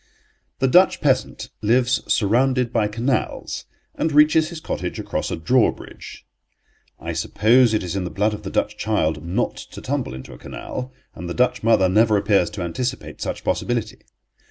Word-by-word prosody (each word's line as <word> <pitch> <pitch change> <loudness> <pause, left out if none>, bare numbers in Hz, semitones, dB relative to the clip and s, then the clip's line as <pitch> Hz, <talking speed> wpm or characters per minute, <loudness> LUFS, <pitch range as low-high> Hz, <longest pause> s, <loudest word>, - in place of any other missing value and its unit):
The 135 - +1
Dutch 180 +8 +5
peasant 135 -3 0
lives 125 +3 +2
surrounded 125 +3 +2
by 110 -3 +2
canals, 120 +5 -2 0.3
and 160 - -1
reaches 150 +1 +4
his 170 -2 -7
cottage - - -4
across - - -3
a - - -2
drawbridge. 115 +10 -1 0.7
I 85 +1 -5
suppose 110 +9 +3
it 110 - 0
is 90 0 -4
in 95 - -1
the 90 - -4
blood 105 +4 0
of 105 - -6
the - - -6
Dutch - - -1
child 80 -8 0
not 95 +9 -1
to - - -10
tumble 65 - -3
into 65 - -10
a - - -13
canal, 130 +1 -7 0.2
and 85 +1 -7
the 85 - -4
Dutch 125 0 +1
mother 110 -4 +4
never 105 +3 +3
appears 100 -3 +2
to 105 -3 -5
anticipate 125 +10 -4
such - - -4
possibility. 115 -3 -2
110 Hz, 170 wpm, -22 LUFS, 95-125 Hz, 0.7 s, Dutch